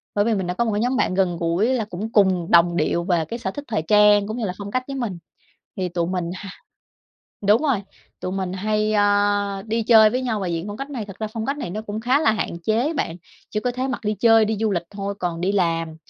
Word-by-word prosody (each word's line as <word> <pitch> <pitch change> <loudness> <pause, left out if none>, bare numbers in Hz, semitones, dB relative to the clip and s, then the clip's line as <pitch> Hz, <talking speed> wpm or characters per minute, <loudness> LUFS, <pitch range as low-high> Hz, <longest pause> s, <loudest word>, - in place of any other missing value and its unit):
bởi 205 - +2
vì 230 - +2
mình 190 -3 -1
đã 180 - -1
có 235 +6 0
một 220 - 0
cái 210 - 0
nhóm 250 +2 +1
bạn 185 - +1
gần 185 -3 +1
gũi 170 +6 +1
là 225 -4 0
cũng 210 +3 -5
cùng 190 -6 +2
đồng 170 0 +5
điệu 170 +2 +1
về 175 -3 +1
cái 235 +9 -6
sở - - -3
thích 290 - -7
thời 210 -9 -1
trang 210 +3 +5
cũng 220 +3 -4
như 225 - -2
là 180 - -2
phong 200 0 -7
cách 255 0 -1
với 275 - -5
mình. 225 -9 -3 0.6
Thì 185 -1 -1
tụi 170 -1 -1
mình 180 -2 -2
hà 195 +1 -8 1.0
Đúng 215 +7 +5
rồi, 260 -10 +1 0.4
tụi 185 - -4
mình 190 -2 -3
hay, 215 +2 0
a, 205 -1 +2
đi 225 +1 -1
chơi 220 -2 +6
với 255 +2 -1
nhau 225 -5 -1
và 190 - -2
diện 170 -1 -2
phong 205 - -6
cách 275 +3 -6
này. 240 -6 -4
Thực 195 -1 -11
ra 215 - -2
phong 225 -1 -4
cách 280 +2 -2
này 175 - -4
nó 215 +3 -4
cũng 215 0 -5
khá 255 +5 +2
là 220 - +3
hạn 185 -5 -3
chế 240 +9 +1
bạn. 165 - -2 0.3
Chỉ 210 - -2
có 250 - -1
thể 255 +2 -2
mặc 260 - -3
đi 210 - 0
chơi, 225 +1 +5
đi 215 0 -1
du 220 -1 +1
lịch 175 - 0
thôi, 200 0 -4
còn 170 -2 -2
đi 190 +3 0
làm, 165 -4 0
205 Hz, 270 wpm, -22 LUFS, 180-225 Hz, 1.0 s, chơi